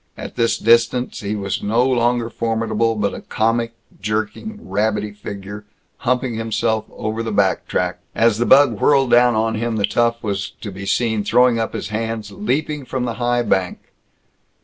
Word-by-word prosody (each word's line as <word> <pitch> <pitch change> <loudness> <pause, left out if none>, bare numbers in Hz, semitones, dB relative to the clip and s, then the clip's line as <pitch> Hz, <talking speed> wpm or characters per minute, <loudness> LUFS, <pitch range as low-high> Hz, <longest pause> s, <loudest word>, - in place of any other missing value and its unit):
At - - -8
this 115 0 +1
distance 115 +2 +2
he 105 0 -3
was 100 -2 -3
no 115 +4 +2
longer 120 -2 +1
formidable, 115 +1 0
but 105 -2 -1
a - - -7
comic, 115 +1 0 0.3
jerking, 110 - -3
rabbity 105 +2 0
figure, 105 0 -8 0.3
humping 125 -1 0
himself 110 0 -1
over 110 +1 -4
the 115 -1 -3
back 100 -2 +1
track. - - -1 0.2
As 115 -1 +3
the 120 - +1
bug 130 -6 +5
whirled 135 -3 +3
down 120 0 +5
on 110 +1 +1
him, 115 +1 -2
the 105 -2 +2
tough 120 0 0
was 100 -3 -2
to 105 - -5
be 100 +1 -7
seen 110 -2 +1
throwing 125 +1 +3
up 110 - -2
his - - -4
hands, 110 -1 -3
leaping 140 +8 -2
from 130 -1 -3
the 120 - -2
high 120 0 +2
bank. 95 -5 -1
115 Hz, 170 wpm, -20 LUFS, 105-120 Hz, 0.3 s, bug